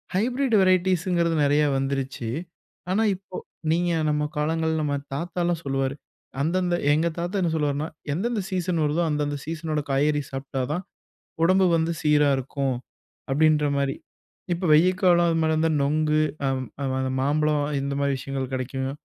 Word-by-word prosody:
Hybrid 245 +4 +1
வெரைட்டிஸ்ங்கிறது 180 -2 +2
நெறையா 145 +1 +3
வந்துருச்சி. 135 -3 -2 0.6
ஆனா, 210 +4 +2
இப்போ 185 -1 -10 0.3
நீங்க 175 +2 +1 0.2
நம்ம 150 0 +1
காலங்கள்ல 160 +1 0
நம்ம 145 -1 0 0.2
தாத்தாலாம் 175 +1 -1
சொல்லுவாரு, 135 0 -1 0.5
அந்தந்த 175 +3 +1 0.2
எங்க 160 +3 +2
தாத்தா 175 +4 -3
என்ன 170 -2 +1
சொல்லுவாருன்னா, 150 0 -1 0.2
எந்தெந்த 215 +6 -1
சீசன் 180 -3 -1
வருதோ, 150 +3 +1
அந்தந்த 145 -1 -1
சீசனோட 155 -1 -2
காய்கறி 145 +2 +2
சாப்பிட்டா 135 0 -4
தான் 180 +4 -3 0.6
உடம்பு 185 +2 +4
வந்து 160 +1 0
சீரா 150 -1 +4
இருக்கும். 135 -1 -2 0.5
அப்படின்ற 150 +2 +3
மாரி, 140 -1 0 0.6
இப்ப 175 +1 -2
வெய்ய 170 +4 +6
காலம் 175 -2 +5
அது 165 - +1
மாரி 160 0 +2
இருந்தா 160 +1 +2
நொங்கு 155 +2 +2 0.2
அ - - +2 0.7
மாம்பழம் 150 +1 +1 0.2
இந்த 140 0 -2
மாரி 140 -1 +1
விஷயங்கள் 135 -1 -4
கெடைக்கும். 130 +1 -3
155 Hz, 140 wpm, -25 LUFS, 140-175 Hz, 0.7 s, வெய்ய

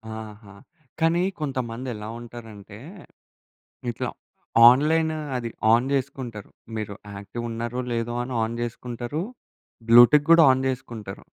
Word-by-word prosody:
ఆహా! 105 -2 -10 0.5
కానీ 165 +2 +2 0.2
కొంతమందెలా 125 -5 -4
ఉంటారంటే, 110 -3 -11 1.1
ఇట్లా 115 - -3 0.6
ఆన్‌లైన్ 160 +5 +2 0.2
అది 120 -1 -4 0.2
ఆన్ 120 +3 +3
జేసుకుంటరు. 130 -6 -4 0.3
మీరు 105 -2 -5 0.2
యాక్టివ్ 100 +4 -7
ఉన్నారో, 120 +2 -4
లేదో 115 0 -2
అని 125 0 -6
ఆన్ 115 +1 -3
జేసుకుంటారు. 120 +5 -4 0.7
బ్లూటిక్ 120 +6 +7
గూడా 165 -2 +8
ఆన్ 130 +1 -2
జేసుకుంటారు. 110 -6 -6
120 Hz, 105 wpm, -24 LUFS, 110-130 Hz, 1.1 s, గూడా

